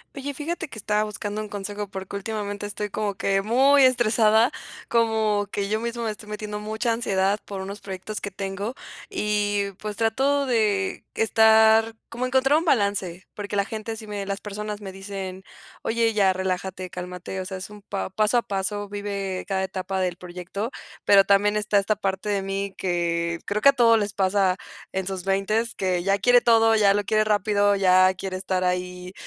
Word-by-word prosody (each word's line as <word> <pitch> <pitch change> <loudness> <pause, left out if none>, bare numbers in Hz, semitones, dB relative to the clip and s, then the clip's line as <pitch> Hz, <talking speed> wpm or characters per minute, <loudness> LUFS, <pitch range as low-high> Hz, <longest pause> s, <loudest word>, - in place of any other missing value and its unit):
Oye, 280 +1 -4
fíjate 310 +5 -4
que 225 - -9
estaba 210 +1 +1
buscando 210 0 -4
un 210 - -7
consejo, 205 +1 -5
porque 190 +1 -6
últimamente 205 0 -4
estoy 205 0 -4
como 205 0 -2
que 195 0 +1
muy 270 +6 +5
estresada, 230 -2 +4 0.4
como 220 -3 +1
que 200 -1 -2
yo 215 +1 0
misma 235 0 -3
me - - 0
estoy 210 0 -11
metiendo 210 0 -5
mucha 220 +3 -2
ansiedad, 200 -3 +1
por 195 -2 -6
unos 195 +2 -7
proyectos 195 +2 -6
que 200 - -5
tengo 195 +4 -4 0.4
y, 205 - 0
pues, 210 -1 -5
trato 270 +6 +1
de, 210 -5 +1
estar, 220 0 +5 0.2
como 240 +2 -3
encontrar 265 +3 +3
un 335 - -5
balance, 200 - 0
porque 205 0 -5
la 200 -1 +2
gente 220 +1 -5
sí 220 0 -9
me 205 -1 -4
las 200 0 -2
personas 210 0 -6
me 195 -2 -7
dicen: 190 -1 -7 0.4
"Oye, 225 0 +1
ya, 200 -3 +4
relájate, 185 0 -3
cálmate, 180 +1 -6
o - - -6
sea, 190 0 -5
es 185 - -8
un 210 0 -12
pa 200 -1 -4
paso 215 +4 +2
a - - +4
paso, 205 +1 -3
vive 200 -2 -4
cada 190 -1 0
etapa 190 0 -3
del 180 -2 0
proyecto", 180 +4 -5 0.4
pero 195 -1 +6
también 205 +1 +3
esta 210 -1 +2
esta 205 +2 0
parte 195 0 -2
de 200 -1 +1
mí, 195 0 -3
que 170 -2 -1
creo 210 +1 -1
que 280 - +9
a - - +5
todos 230 -3 +5
les 205 -1 -2
pasa 190 -1 +2 0.3
en 190 0 -2
sus 190 -2 -4
veintes, 205 +4 0
que 185 -2 0
ya 195 +1 +2
quiere 245 +5 +6
todo, 225 -1 +5
ya 205 -2 +5
lo 205 0 0
quiere 215 +1 +2
rápido, 205 -1 +2
ya 185 -1 +5
quiere 185 0 -5
estar 185 -1 -1
ahí 180 0 -2
205 Hz, 190 wpm, -24 LUFS, 190-220 Hz, 0.4 s, que